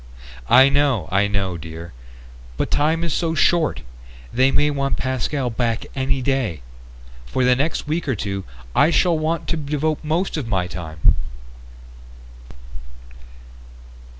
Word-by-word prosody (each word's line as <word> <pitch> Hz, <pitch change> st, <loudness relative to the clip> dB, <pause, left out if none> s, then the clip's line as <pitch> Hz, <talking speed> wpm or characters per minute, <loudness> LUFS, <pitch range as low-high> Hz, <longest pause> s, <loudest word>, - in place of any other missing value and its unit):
"I 130 Hz, +2 st, +8 dB
know, 140 Hz, -, +1 dB
I 100 Hz, +2 st, +3 dB
know, 100 Hz, -3 st, -2 dB
dear. 80 Hz, 0 st, -9 dB, 0.6 s
But -, -, -2 dB
time 160 Hz, +3 st, +2 dB
is 170 Hz, -4 st, -1 dB
so 165 Hz, -2 st, 0 dB
short. 155 Hz, -, +2 dB, 0.5 s
They 130 Hz, +2 st, +4 dB
might 145 Hz, +2 st, +2 dB
want 140 Hz, -1 st, -1 dB
Pascal 130 Hz, 0 st, -1 dB
back 115 Hz, 0 st, -1 dB
any 135 Hz, 0 st, -1 dB
day. 120 Hz, -, -1 dB, 0.6 s
For 130 Hz, -, 0 dB
the 125 Hz, 0 st, +4 dB
next 145 Hz, +3 st, -1 dB
week 155 Hz, +1 st, -2 dB
or 130 Hz, -, +1 dB
two 100 Hz, -1 st, -3 dB, 0.3 s
I 150 Hz, -, +5 dB
shall 170 Hz, 0 st, +3 dB
want 160 Hz, +1 st, -1 dB
to 165 Hz, -, 0 dB
devote 150 Hz, +1 st, -2 dB
most 165 Hz, +4 st, -1 dB
of 140 Hz, -6 st, -3 dB
my 95 Hz, -5 st, 0 dB
time 80 Hz, -3 st, -8 dB
135 Hz, 135 wpm, -21 LUFS, 100-150 Hz, 0.6 s, I